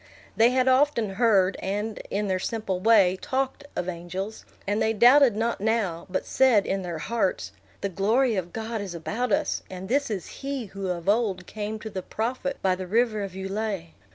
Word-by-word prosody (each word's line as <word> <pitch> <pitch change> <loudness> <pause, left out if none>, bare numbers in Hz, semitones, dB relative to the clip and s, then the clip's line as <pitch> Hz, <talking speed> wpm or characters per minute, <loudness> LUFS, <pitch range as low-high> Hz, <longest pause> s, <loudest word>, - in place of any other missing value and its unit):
They 225 +2 +5
had 255 0 +2
often 260 -5 +3
heard, 195 -3 +3
and, 205 +3 -3
in 205 +1 -1
their 185 -1 0
simple 205 -3 -2
way, 190 -3 +4
talked, 270 +2 -2
of 175 - -2
angels; 185 +4 -5 0.2
and 205 +2 0
they 220 - +2
doubted 245 +2 +6
not 230 -1 -1
now, 205 -6 0
but 185 - -2
said, 250 -6 +4
in 195 0 -1
their 175 -3 -4
hearts, 185 - -1 0.3
The 200 - -1
glory 220 +6 +2
of 180 -2 -3
God 225 0 -4
is 190 -4 -6
about 220 +9 -2
us, - - +1
and 185 0 -7
this 280 +2 +1
is 195 -5 -3 0.2
he 275 -3 -3
who 195 -1 -6
of 175 -1 -3
old 200 -4 +1
came 215 +2 -5
to 220 - -6
the 190 - -4
prophet 250 +8 -3
by 190 -1 +3
the 185 0 -5
river 220 +1 +1
of 195 -2 -5
Ulai. 195 -2 -3
210 Hz, 190 wpm, -26 LUFS, 190-235 Hz, 0.3 s, doubted